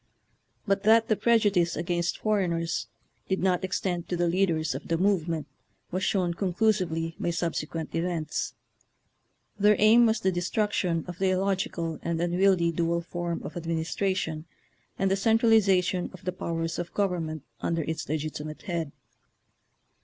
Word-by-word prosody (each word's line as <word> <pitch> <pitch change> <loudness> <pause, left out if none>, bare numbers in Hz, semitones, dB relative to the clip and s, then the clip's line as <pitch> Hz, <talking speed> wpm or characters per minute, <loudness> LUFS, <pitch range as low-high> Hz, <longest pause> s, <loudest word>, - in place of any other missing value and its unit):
But 200 -1 +1
that 220 +2 +4
the 215 - +4
prejudice 205 -7 +3
against 170 0 -1
foreigners 175 -6 0 0.4
did 190 - +1
not 185 -1 +1
extend 180 -2 -2
to 175 - -1
the 175 0 +2
leaders 170 -3 +1
of - - -7
the 165 - +1
move 185 -2 +2
ment 160 -2 -2 0.5
was 185 +2 -2
shown 180 -3 +1
conclusively 175 -3 0
by - - -1
subse 170 -2 -1
quent 160 -1 -5
events. 165 -2 -2 1.0
Their 210 +1 +5
aim 230 +3 +6
was 220 0 +1
the 190 - +2
de 175 -1 -2
struction 180 -4 0
of 180 -1 -7
the 190 -1 +2
illogical 185 -3 -1
and 170 -1 -2
unwieldy 175 0 +3
dual 170 +1 0
form 175 0 -4
of - - -7
administration 165 0 -2 0.5
and 195 0 +1
the - - +4
cen 220 +3 +3
tralization 195 -6 +3
of - - -15
the 185 - 0
powers 165 -2 -3
of 175 - -5
government 170 -6 -1 0.2
under 165 -1 0
its 160 -1 -4
legitimate 155 0 -4
head. 165 -5 -3
175 Hz, 155 wpm, -27 LUFS, 165-195 Hz, 1.0 s, aim